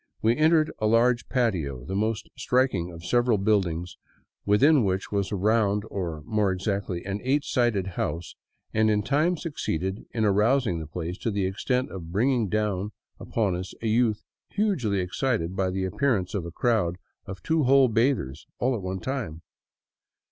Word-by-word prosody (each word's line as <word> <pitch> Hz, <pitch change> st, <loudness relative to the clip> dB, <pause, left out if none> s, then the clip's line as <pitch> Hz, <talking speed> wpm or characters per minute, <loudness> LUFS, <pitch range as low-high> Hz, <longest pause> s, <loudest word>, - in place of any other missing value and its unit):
We 115 Hz, +2 st, +4 dB
entered 155 Hz, +2 st, +3 dB
a 110 Hz, -, +1 dB
large 120 Hz, +2 st, +3 dB
patio, 85 Hz, -, -1 dB
the 95 Hz, -, -5 dB
most 110 Hz, +2 st, -1 dB
striking 125 Hz, -9 st, +1 dB
of 85 Hz, 0 st, -10 dB
several 120 Hz, 0 st, +2 dB
build 100 Hz, -1 st, +2 dB
ings 85 Hz, +2 st, -6 dB, 0.5 s
within 135 Hz, +7 st, +5 dB
which 95 Hz, -1 st, -1 dB
was 100 Hz, -2 st, -1 dB
a -, -, 0 dB
round, 105 Hz, 0 st, +2 dB
or, 85 Hz, -6 st, -4 dB
more 105 Hz, -3 st, +1 dB
exactly, 95 Hz, -2 st, -2 dB
an 100 Hz, +1 st, -3 dB
eight 140 Hz, +3 st, +1 dB
sided 120 Hz, -9 st, +1 dB
house, 85 Hz, -2 st, -4 dB, 0.4 s
and 110 Hz, 0 st, +3 dB
in 105 Hz, -1 st, +2 dB
time 150 Hz, -, +1 dB
succeeded 95 Hz, -, -3 dB
in 110 Hz, -2 st, -1 dB
arousing 105 Hz, -1 st, +2 dB
the 80 Hz, -, -6 dB
place 85 Hz, +3 st, -5 dB
to -, -, -1 dB
the 100 Hz, -3 st, 0 dB
extent 125 Hz, +7 st, -1 dB
of 85 Hz, -3 st, -8 dB
bringing 115 Hz, +2 st, +1 dB
down 105 Hz, -1 st, -1 dB, 0.3 s
upon 105 Hz, -6 st, -1 dB
us 90 Hz, +1 st, -6 dB
a -, -, 0 dB
youth 110 Hz, -1 st, +2 dB, 0.3 s
hugely 145 Hz, -, 0 dB
excited 90 Hz, -1 st, -1 dB
at 95 Hz, -1 st, +1 dB
the 95 Hz, 0 st, -1 dB
appearance 100 Hz, -3 st, 0 dB
of 95 Hz, -5 st, -2 dB
a -, -, -7 dB
crowd 105 Hz, -4 st, +1 dB, 0.3 s
of 95 Hz, -2 st, -8 dB
two 160 Hz, -3 st, +1 dB
whole 135 Hz, 0 st, +6 dB
bathers 115 Hz, -, 0 dB
all 130 Hz, +2 st, +1 dB
at 115 Hz, -, -3 dB
one 95 Hz, 0 st, -4 dB
time. 110 Hz, -, -4 dB
105 Hz, 170 wpm, -26 LUFS, 95-125 Hz, 0.5 s, whole